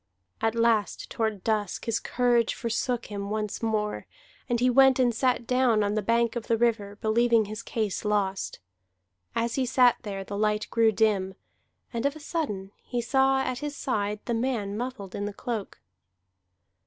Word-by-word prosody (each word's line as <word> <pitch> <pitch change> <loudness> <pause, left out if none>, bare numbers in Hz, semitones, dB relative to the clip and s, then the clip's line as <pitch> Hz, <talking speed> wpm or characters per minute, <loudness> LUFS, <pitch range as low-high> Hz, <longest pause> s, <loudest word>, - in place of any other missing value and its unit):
At 225 0 +1
last 230 -3 +1
toward 220 -6 -2
dusk 210 -4 -1
his 230 -1 0
courage 240 -2 +1
forsook 235 0 -1
him 200 -1 -4
once 210 -1 -3
more, 215 -2 -1 0.4
and 240 -1 +1
he 250 - +3
went 265 +1 +6
and 250 -2 +3
sat 250 +1 +1
down 250 -3 +3
on 205 0 0
the 215 - 0
bank 230 +3 +1
of 235 - -4
the 230 - +2
river, 220 -3 0
believing 225 +1 +3
his 215 +2 -6
case 220 -4 -2
lost. 200 -2 -1 0.8
As 230 0 0
he 265 - +1
sat 250 -1 +5
there 195 -2 -5
the 200 +1 -5
light 210 0 +1
grew 230 -1 +4
dim, 200 -3 +1 0.6
and 235 +3 +1
of 285 - -3
a - - -9
sudden 240 - -3
he 245 - -3
saw 265 +3 +3
at 255 -2 -2
his 295 0 -4
side 210 -7 -1
the 240 - -1
man 225 -4 -1
muffled 225 -5 -5
in 205 - -3
the 205 - -4
cloak. 220 -1 -5
225 Hz, 175 wpm, -27 LUFS, 210-245 Hz, 0.8 s, went